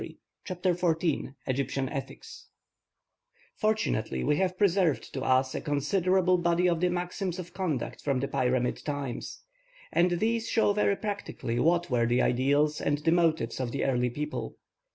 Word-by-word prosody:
CHAPTER 180 0 0
XIV 165 -5 0
EGYPTIAN 135 0 -1
ETHICS 135 - -8 1.1
Fortunately 215 - 0
we 150 +1 +2
have 185 -1 0
preserved 185 -6 +1
to 135 - -3
us 130 0 +2
a - - -3
considerable 180 +5 +2
body 175 +1 +2
of 170 -2 +1
the 180 +1 +2
maxims 180 +1 -3
of 175 -1 -8
conduct 160 -10 -3
from 140 -3 0
the 140 - -1
Pyramid 125 -2 0
times; 145 -4 -5 0.5
and 175 +1 +3
these 230 +1 0
show 220 -3 +3
very 200 -1 +2
practically 200 - -4
what 170 -1 +2
were 120 -1 +2
the 120 +1 +2
ideals 145 +4 +2
and 145 - +1
the 155 +3 +1
motives 160 -9 +1
of 125 -3 -2
the 140 - -1
early 125 -2 +1
people. 150 +5 -4
160 Hz, 155 wpm, -28 LUFS, 135-180 Hz, 1.1 s, and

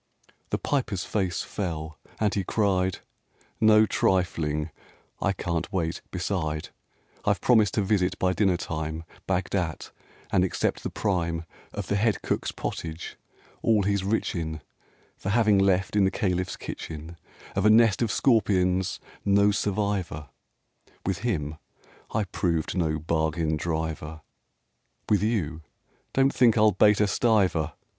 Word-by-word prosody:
X - - -29
The - - 0
Piper's 105 -10 -1
face 95 -5 -1
fell, 80 -5 -4 0.2
and 105 -2 +2
he 100 - 0
cried, 95 -3 0 0.6
"No 110 0 +6
trifling! 80 -6 0 0.5
I 100 - +2
can't 85 -3 -3
wait! 85 -3 -1
beside, 85 -5 -2 0.5
I've - - +2
promised 110 -6 +4
to 105 - +2
visit 95 -2 +1
by 95 0 +1
dinner 95 -3 +2
time 80 -2 -4 0.2
Bagdat, 90 -3 -1 0.4
and 90 - +4
accept 95 - -1
the - - -3
prime 85 -5 -1 0.3
Of - - -4
the 100 - 0
Head 110 +1 +1
Cook's - - -1
pottage, 80 0 -5 0.5
all 110 -3 +3
he's 100 -1 +1
rich 105 +4 0
in, 80 -3 -4 0.6
For 95 - -4
having 105 -2 +4
left, 95 0 +2
in 105 - +4
the 95 - +4
Caliph's 90 -2 -1
kitchen, 80 +1 -7 0.4
Of 95 - +1
a - - +7
nest 110 -1 +5
of 115 -3 +1
scorpions 95 -7 +2 0.2
no 100 +1 +4
survivor; 100 -7 -1 0.8
With 95 -2 -1
him 80 -10 -2 0.5
I 110 - 0
proved 85 -4 -1
no 80 -4 +1
bargain 80 0 0
driver; 80 0 -3 0.9
With 105 -3 +3
you, 90 -8 -1 0.5
don't 135 +1 +3
think 120 -3 +4
I'll 110 0 +6
bate 105 +2 +4
a 105 - +4
stiver! 95 - +2
95 Hz, 135 wpm, -26 LUFS, 80-105 Hz, 0.9 s, a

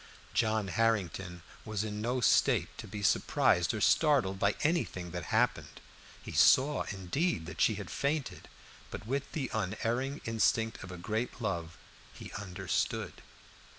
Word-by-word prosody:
John 110 -3 +1
Harrington 95 -5 0 0.2
was 110 -1 -2
in 105 -1 -4
no 125 +3 -1
state - - +3
to - - -7
be 105 -1 -6
surprised 90 -3 +3
or 110 - -3
startled 130 -13 +3
by 100 +1 +2
anything 145 - 0
that 90 -2 -5
happened. - - 0 0.4
He - - -7
saw, 140 +3 +4
indeed, 95 - -1
that 90 - -6
she 110 - +4
had 100 -2 -7
fainted, 140 0 -2 0.4
but - - -7
with 135 +4 -2
the 135 -6 -3
unerring 115 +7 -1
instinct 115 0 +1
of 95 - -8
a 90 - -7
great 110 +9 -3
love 85 -7 -3 0.4
he - - -9
understood. 100 -3 -3
110 Hz, 145 wpm, -31 LUFS, 95-125 Hz, 0.4 s, saw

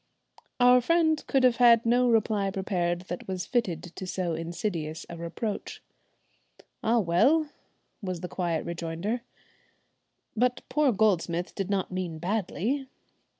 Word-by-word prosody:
Our 250 0 +6
friend 315 +2 +2
could 270 -2 +2
have 250 -2 +4
had 235 -2 +6
no 245 +1 +3
reply 215 -3 +2
prepared 180 -3 -1
that 180 -1 -7
was 185 -2 -3
fitted 195 -10 -1
to 190 - -6
so 180 -2 -2
insidious 165 -1 -4
a - - -6
reproach. 170 +6 -5 1.0
"Ah! 230 +2 +2
well," 265 - +3 0.5
was 185 -4 -4
the 180 - -4
quiet 170 -3 -2
rejoinder, 170 +7 -3 1.1
"but 250 +2 +1
poor 300 -3 +3
Goldsmith 185 -5 +1
did 195 -1 -3
not 195 -2 -1
mean 180 -3 -3
badly." 220 - -2
195 Hz, 130 wpm, -28 LUFS, 175-240 Hz, 1.1 s, Our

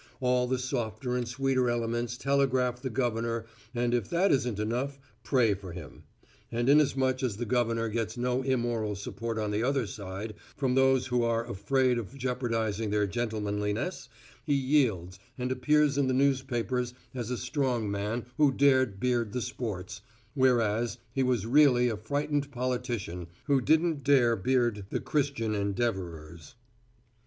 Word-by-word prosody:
All 125 -1 +2
the 130 +1 0
softer 125 -1 -2
and 125 -1 -1
sweeter 130 0 +1
elements 120 0 -1
telegraph 130 -3 +1
the 130 - -3
Governor 115 -2 -1 0.3
and 120 0 +1
if 120 -5 0
that 185 +4 +2
isn't 125 -6 +1
enough, 125 +6 -2 0.3
pray 120 -6 +3
for 95 -3 -8
him; 85 -3 -10 0.5
and 120 +1 -1
inasmuch 135 -3 +3
as 120 -6 -1
the 120 - -3
Governor 115 -1 +1
gets 110 +1 -3
no 125 +1 0
immoral 120 -5 -1
support 115 +3 -5
on 105 -1 -1
the 105 +1 0
other 135 0 +1
side 100 +1 -6 0.2
from 130 -3 +1
those 135 -1 +4
who 125 -1 +1
are 115 0 0
afraid 125 +3 +1
of 120 +5 -8
jeopardizing 115 -4 -1
their 105 0 +2
gentlemanliness, 110 - -2 0.3
he 145 - +1
yields, 120 - +1 0.2
and 125 0 -2
appears 145 +2 +2
in 140 - +2
the 130 - +1
newspapers 130 -2 0 0.2
as 120 -3 -4
a 125 - -2
strong 125 -8 -1
man 105 +4 -2
who 150 -3 +5
dared 130 -7 +3
beard 120 -3 0
the 125 - -1
sports, 105 -5 -5 0.3
whereas, 120 -4 +2 0.2
he 135 - 0
was 125 -5 +1
really 125 -1 +5
a 110 - -2
frightened 145 +5 -1
politician 120 -8 -3 0.2
who 140 -3 +2
didn't 160 +2 +2
dare 130 -5 +4
beard 120 -1 +1
the - - -1
Christian 140 -7 -1
Endeavorers. 95 -7 -3
120 Hz, 150 wpm, -29 LUFS, 110-130 Hz, 0.5 s, who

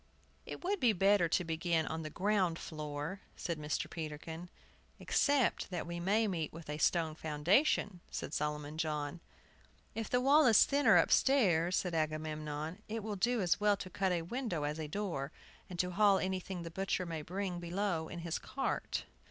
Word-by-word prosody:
"It - - -7
would 395 +2 0
be 240 -3 +4
better 195 -2 +4
to 180 - +2
begin 165 0 0
on 160 +2 -3
the 155 - -5
ground 185 -1 +1
floor," 155 +4 -5
said 170 -3 -3
Mr. 150 -1 -2
Peterkin. 160 +2 -6 0.5
"Except 285 -3 +2
that 175 -3 -3
we 170 0 -5
may 210 +5 +2
meet 165 -6 -2
with 160 -2 -8
a 150 - -4
stone 165 -1 +2
foundation," 175 - +1
said - - -5
Solomon 150 0 -2
John. 150 0 -2 0.7
"If 225 -1 -4
the 250 - +3
wall 280 +3 +5
is 225 -4 +7
thinner 285 +1 +5
upstairs," 185 -11 +4
said 180 -2 -1
Agamemnon, 155 +1 -3
"it 225 0 -3
will 215 -1 -3
do 235 +4 +1
as 180 0 +2
well 205 -1 +3
to 185 - -7
cut 190 +1 0
a 170 -2 0
window 215 - -3
as 150 +2 -2
a 155 - -3
door, 160 -6 -3 0.4
and 180 -2 -7
haul 195 +3 +4
up - - -1
anything 185 -1 -3
the 165 - -7
butcher 190 +1 -1
may 165 -2 -4
bring 180 +2 -3
below 175 -1 -1
in 175 +1 -7
his 170 -1 -2
cart." 270 - -2
175 Hz, 175 wpm, -34 LUFS, 160-200 Hz, 0.7 s, is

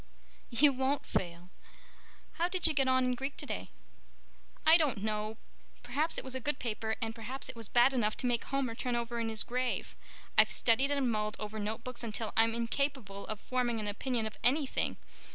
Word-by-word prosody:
"You 275 +4 +5
won't 265 +2 0
fail. 175 0 -3 0.9
How 340 - +3
did 365 -1 +1
you 320 - +6
get 270 -2 +2
on 260 0 +4
in 250 - +1
Greek 270 +3 -4
today?" - - -4 1.0
"I 320 +1 +9
don't 285 - +2
know. 215 0 -2 0.5
Perhaps 285 +7 0
it - - 0
was 260 - -4
a 260 - -2
good 285 +2 -1
paper 220 -2 -2
and 225 0 -2
perhaps 240 +5 -5
it 260 - -5
was 230 -2 -6
bad 245 +4 +5
enough 215 -4 +1
to - - -2
make 240 -2 +1
Homer 275 -4 -1
turn 245 +1 -2
over 235 0 -2
in 225 -1 -1
his 220 0 +1
grave. 250 +1 -2 0.4
I've - - +7
studied 250 +4 +3
and 275 -4 +1
mulled 215 -1 -1
over 215 0 -4
notebooks 225 +4 -4
until 220 -1 -3
I'm 225 0 +4
incapable 235 -4 -2
of 215 -1 -4
forming 245 -2 -1
an 210 - -3
opinion 230 +2 -1
of 220 - -6
anything. 275 +2 +1
240 Hz, 190 wpm, -32 LUFS, 220-265 Hz, 1.0 s, I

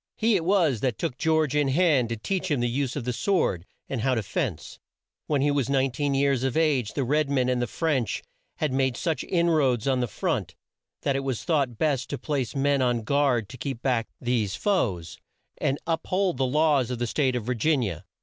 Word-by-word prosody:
He 225 -1 +3
it 175 - +1
was 170 - +3
that 125 -1 -1
took 160 -7 -2
George 160 -3 +2
in 145 -1 +2
hand 140 -4 +3
to 115 - -3
teach 185 - -2
him 145 -4 +1
the 120 - +1
use 130 +1 -1
of 145 - -3
the 125 +1 -2
sword, 115 - 0 0.2
and 130 -4 -3
how 130 +2 +2
to 115 - -1
fence. - - -4 0.5
When 145 -3 +1
he 145 - +3
was 140 -4 0
19 135 +1 +1
years 135 -2 +2
of 135 +2 0
age 145 -9 +1
the 140 - 0
red 150 +3 +1
men 130 -3 +1
and 125 -1 +1
the 120 - 0
French 140 - -1 0.3
had 150 -4 -1
made 130 -2 +1
such 165 -2 -1
in 170 -1 +1
roads 135 -7 +2
on 130 -2 +2
the 125 - 0
front, - - -2 0.5
that 140 - +1
it - - +1
was 130 -4 -3
thought 140 -9 0
best 145 -3 0
to 140 - -3
place 135 -2 -2
men 140 0 +2
on 120 -3 +1
guard 135 -4 +1
to 130 - -9
keep 130 -3 -5
back 120 -4 +1
these 115 -5 0
foes, 105 - -1 0.4
and 135 - 0
to - - -23
up 165 -1 -2
hold 185 -5 +1
the 130 0 +1
laws 145 -2 +2
of 125 - -3
the 120 - -1
state 130 +1 0
of 120 -4 -3
Vir 125 - 0
gin 135 +3 +1
i - - 0
a. 85 -1 -7
135 Hz, 230 wpm, -26 LUFS, 120-150 Hz, 0.5 s, He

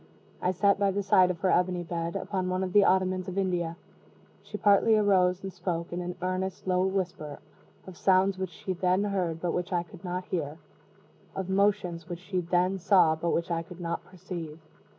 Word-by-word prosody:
I - - +1
sat 195 +2 +2
by 200 -1 +3
the 200 +1 -1
side 185 -1 +5
of 175 -2 -4
her 185 - +2
ebony 180 0 +1
bed, 170 0 -3
upon 190 -2 -2
one 185 +1 0
of 185 -1 -4
the 205 - +7
ottomans 185 0 +2
of 185 +1 -5
India. 175 -3 0 0.7
She 210 - -7
partly 210 +2 +4
arose, 185 -3 +3
and 190 -1 -5
spoke, 170 -2 -3
in 175 - -2
an 180 0 -4
earnest 185 0 -2
low 185 0 +2
whisper, 180 -6 -3 0.5
of 185 - -10
sounds 190 +1 +3
which 190 -1 -2
she 185 +3 -5
then 185 +2 +1
heard, 185 -5 -1
but 175 - 0
which 180 +1 -3
I 175 -1 +1
could 185 0 -15
not 180 0 -3
hear 155 -4 -3 0.8
of 190 -1 -4
motions 190 -4 +1
which 175 - -4
she 185 +1 -3
then 180 +2 +1
saw, 180 -3 +5
but 170 +2 -2
which 170 +1 -1
I 165 -1 0
could 170 +2 -12
not 170 -1 -3
perceive. 175 -4 -8
185 Hz, 200 wpm, -28 LUFS, 175-190 Hz, 0.8 s, the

